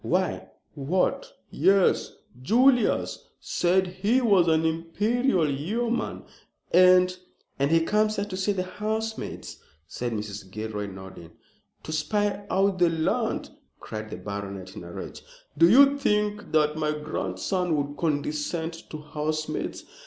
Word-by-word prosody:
"Why - - -1 0.2
what 185 - -1 0.2
yes. 195 -1 +3 0.3
Julius 245 - +2
said 185 +2 +1
he 195 +7 +1
was 200 -8 +4
an 160 0 +3
Imperial 180 - +1
Yeoman 215 - -2 0.5
and 180 +1 +6 0.2
" - - -40
"And 140 +1 +2
he 165 +1 +4
comes 215 +5 +1
here 200 - -1
to 200 -2 -6
see 190 +2 0
the 190 -2 -1
housemaid," 220 +4 -4 0.4
said 120 -1 -4
Mrs. 105 -2 -6
Gilroy, 105 0 -4
nodding. 95 -3 -11 0.5
"To - - -6
spy 200 +6 -1
out 195 -1 +1
the 175 -1 +5
land," 160 -1 -1 0.3
cried 110 0 -7
the - - -6
baronet, 100 -1 -6
in - - -8
a 85 - -9
rage. - - -8 0.3
"Do 165 +3 +6
you 280 +5 +6
think 210 -4 0
that 150 -1 +2
my 155 -1 0
grandson 155 - -2
would 145 0 -2
condescend 155 +2 -2 0.2
to 155 - -6
housemaids? 155 +1 -3
165 Hz, 135 wpm, -26 LUFS, 145-205 Hz, 0.5 s, and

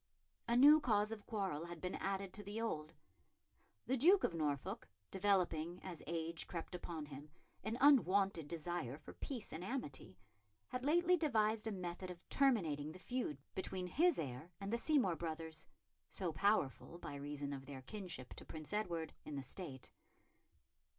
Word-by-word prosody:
A 235 0 +3
new 295 +4 +10
cause 210 -4 +2
of 215 -2 -6
quarrel 190 -8 -1
had 170 -1 -7
been 180 +2 -3
added 195 -1 -2
to 210 - -7
the 205 +2 -5
old. 155 -10 -2 0.9
The 265 +3 +1
Duke 360 +10 +6
of - - +2
Norfolk, 145 - -1 0.2
developing, 180 -4 +1
as 175 -4 -6
age 165 0 -1
crept 170 +1 -5
upon 170 -3 -4
him, 145 +1 -9 0.3
an 220 +3 -2
unwonted 200 - +5
desire 160 -4 -3
for 155 - -11
peace 245 -6 -5
and 160 +3 -4
amity, 185 - -4 0.5
had 250 +1 -3
lately 345 +5 +5
devised 220 -8 +2
a - - 0
method 180 -1 -4
of 175 -1 -9
terminating 160 - +2
the - - -9
feud 240 - -2 0.2
between 185 -1 -2
his 330 - +4
heir 135 +2 -4
and 200 +2 -3
the - - +3
Seymour 250 - +3
brothers, 160 -1 -2 0.4
so 180 -4 -2
powerful, 170 -4 +1
by 175 - -6
reason 145 0 -3
of 135 -1 -7
their 135 -2 -7
kinship 180 - -6
to - - -9
Prince 155 +3 -6
Edward, 170 -7 -1
in 150 - -6
the 140 - -3
State. 135 -2 -6
180 Hz, 165 wpm, -39 LUFS, 155-220 Hz, 0.9 s, new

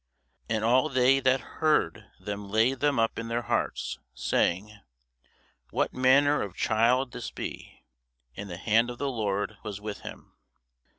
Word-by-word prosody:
And 110 -1 0
all 125 +6 +3
they 130 0 +4
that 130 0 +2 0.2
heard 150 - +2
them 100 -1 -6
laid 115 +5 +2
them 145 0 +2
up 115 0 +1
in 115 - -5
their 120 +1 -2
hearts, - - -2 0.2
saying, 100 - 0 0.9
What - - -1
manner 140 +3 +4
of 95 -3 -5
child 120 +4 +2
shall - - -29
this 115 - -5
be! - - -8 0.5
And 100 0 -7
the 90 - -6
hand 115 +4 +2
of 120 - -6
the 140 +1 -2
Lord 105 -2 -2
was 105 -2 -6
with 105 0 -6
him. - - -11
115 Hz, 160 wpm, -28 LUFS, 105-130 Hz, 0.9 s, they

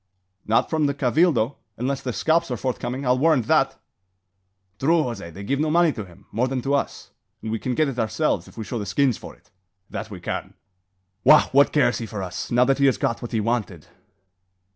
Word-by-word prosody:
"Not 110 - +3
from 155 -2 +2
the 140 - -1
Cabildo, 140 -2 +2 0.2
unless 130 +3 -2
the 125 - -3
scalps 165 +6 +1
are 125 - -2
forthcoming; 130 +2 -3
I'll 125 0 +2
warrant 150 -5 +3
that." - - +2 1.0
"True, 160 +3 +3
Jose! 120 -9 -5
They'll 95 +4 -9
give 140 +6 0
no 155 +1 +1
money 170 0 +4
to 105 -7 -6
him, 95 +2 -18
more 120 +5 0
than 130 0 -2
to 140 - 0
us; 140 - -2 0.3
and 110 - -4
we 115 - -2
can 125 +2 -2
get 155 +2 +2
it 130 -3 -4
ourselves 110 -3 0
if - - -17
we 110 - -4
show 120 +2 -4
the 105 - -5
skins 130 +3 +2
for - - -10
it. - - -30 0.4
That 110 - -5
we 100 -3 -8
can." 90 - -5 0.7
"Wagh! - - +6
what 140 +2 +5
cares 125 -5 +2
he 115 - -5
for 105 -3 -5
us, 90 -1 -5
now 120 +1 +4
that 135 +1 +1
he 140 - +5
has 130 - +2
got 115 - -1
what 120 - -6
he 115 - 0
wanted?" 105 -7 -2
125 Hz, 220 wpm, -23 LUFS, 110-140 Hz, 1.0 s, Wagh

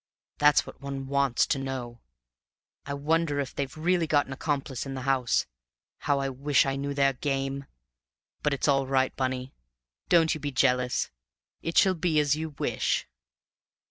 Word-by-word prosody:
That's 150 -1 +5
what - - -12
one 140 -1 -5
wants 140 -2 +2
to 135 - 0
know. 130 -3 -5 0.9
I 140 - -2
wonder 150 0 +1
if 135 -2 -3
they've 140 +1 -4
really 170 +1 +1
got 145 -2 +3
an 135 - -7
accomplice 140 -2 -2
in 135 - -5
the 130 - -4
house? 130 -3 +2 0.5
How 145 - +1
I 135 - -1
wish 135 +1 +2
I 135 0 -1
knew 140 +1 -3
their 140 -1 +3
game! 135 0 -2 0.8
But 150 - +1
it's 140 - -1
all 135 -2 +3
right, 130 -1 +1
Bunny; 130 0 -2 0.6
don't 165 -2 +5
you 155 - -5
be 145 -1 -3
jealous; 125 -1 +1 0.5
it 165 - -3
shall 190 - +6
be 170 -3 +1
as 145 -1 +3
you 160 +1 -4
wish." - - 0
140 Hz, 170 wpm, -27 LUFS, 135-150 Hz, 0.9 s, shall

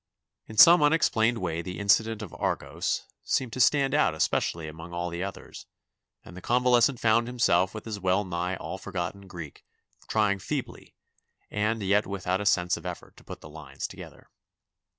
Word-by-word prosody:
In 110 - -11
some 170 +6 +9
unexplained 120 -7 +3
way 85 -4 -2
the 90 +2 -7
incident 110 +2 +2
of 100 - -9
"Argos" - - -2 0.2
seemed 125 -4 -1
to - - -5
stand 135 +2 +3
out 145 - +2
especially 80 +1 -1
among 80 +3 -10
all 85 0 -3
the 85 +1 -4
others 100 0 -8 0.6
and 90 - -12
the 95 - -9
convalescent 125 +1 +3
found 115 +1 +3
himself 95 -6 +2
with 110 - -7
his 110 -3 -5
well 95 +2 +1
nigh 90 0 -3
all 95 +2 -7
forgotten 95 +1 -5
Greek 85 -6 -9 0.4
trying 105 -2 +1
feebly - - -6 0.6
and 110 +1 -1
yet 100 +2 +2
without 95 -1 -2
a 105 - -1
sense 90 -3 +2
of 85 - -12
effort 90 - -8
to - - -16
put - - -10
the - - -11
lines 75 -3 -8
together. - - -13
100 Hz, 170 wpm, -27 LUFS, 90-115 Hz, 0.6 s, some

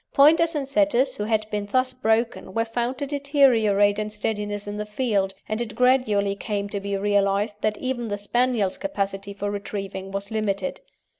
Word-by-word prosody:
Pointers 325 +4 +5
and 280 -2 -2
Setters 275 -3 +2
who 210 - -2
had 215 -1 0
been 205 -1 -2
thus 255 +4 +1
broken 225 -5 0
were 225 0 +1
found 240 +3 -2
to 285 - -2
deteriorate 245 -8 +3
in 215 0 -2
steadiness 210 -1 -3
in 205 0 -4
the 210 - -3
field, 210 -4 0
and 215 +2 -2
it 225 -3 -5
gradually 240 -6 +3
came 205 -1 -3
to 200 - -3
be 200 0 -2
realised 205 +1 +1
that 215 -1 0
even 255 -2 -3
the 205 -1 -2
Spaniel's 225 -1 0
capacity 200 -7 -3
for 205 0 -3
retrieving 195 -1 -5
was 200 +2 -5
limited. 215 +4 -2
215 Hz, 175 wpm, -24 LUFS, 200-255 Hz, -, Pointers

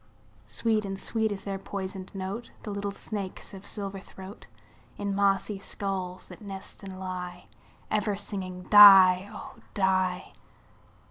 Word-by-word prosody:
Sweet 220 -2 0
and 195 -1 -5
sweet 220 0 0
is 195 -1 -5
their 195 -1 -4
poisoned 190 -1 -6
note, 195 +5 -5
The 210 - -5
little 200 0 -3
snakes' 200 -1 -6
of 195 0 -10
silver 200 -2 -5
throat, 190 +1 -12 0.5
In 200 -1 -2
mossy 200 0 +1
skulls 190 -2 -4
that - - -13
nest 195 -2 -8
and 190 -2 -8
lie, 180 -1 -6 0.5
Ever 210 -1 +1
singing 185 -3 -5
"die, 195 -2 +9
oh! - - -10 0.2
die." 185 -1 +1
195 Hz, 135 wpm, -28 LUFS, 185-205 Hz, 0.5 s, die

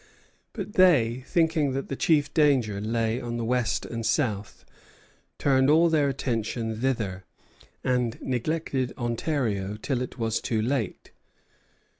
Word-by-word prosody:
But 205 -2 -6
they, 130 -10 +4
thinking 160 -5 +2
that 135 +1 -3
the 135 - -3
chief 145 0 +2
danger 130 -10 +2
lay 115 +2 -1
on 120 0 -4
the 115 - -2
west 125 -1 0
and 115 -1 -5
south, 110 -3 -1 0.7
turned 135 -1 +3
all 165 +3 +5
their 150 -3 +2
attention 115 -4 -2
thither, 110 -8 -1 0.6
and 125 -2 0
neglected 130 0 -2
Ontario 115 -5 -1
till 125 +1 -2
it 125 - -5
was 115 -2 -1
too 115 - -1
late. 115 -3 -2
125 Hz, 130 wpm, -26 LUFS, 115-145 Hz, 0.7 s, all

